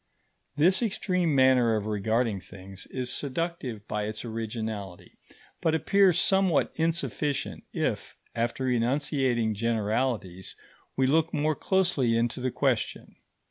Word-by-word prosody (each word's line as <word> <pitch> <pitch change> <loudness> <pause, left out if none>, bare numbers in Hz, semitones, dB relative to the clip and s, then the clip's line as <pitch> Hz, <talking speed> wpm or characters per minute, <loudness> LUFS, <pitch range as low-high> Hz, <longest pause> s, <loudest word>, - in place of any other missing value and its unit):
This 175 - +4
extreme 180 -7 0
manner 130 -4 +4
of 105 -1 -2
regarding 110 +1 0
things 95 0 -10
is 125 -1 -3
seductive 140 -7 -3
by 105 0 -2
its 110 +2 -5
originality, 110 -4 -5 0.4
but 160 -1 +2
appears 180 +2 +4
somewhat 190 -6 +2
insufficient 145 - -2
if, - - -3 0.2
after 120 +3 -1
enunciating 125 -2 +1
generalities, 110 -3 -1 0.4
we 130 - +3
look 160 +5 +2
more 155 +1 +1
closely 160 -13 +1
into 120 +2 0
the 130 +1 -1
question. - - -1
125 Hz, 115 wpm, -27 LUFS, 110-155 Hz, 0.4 s, This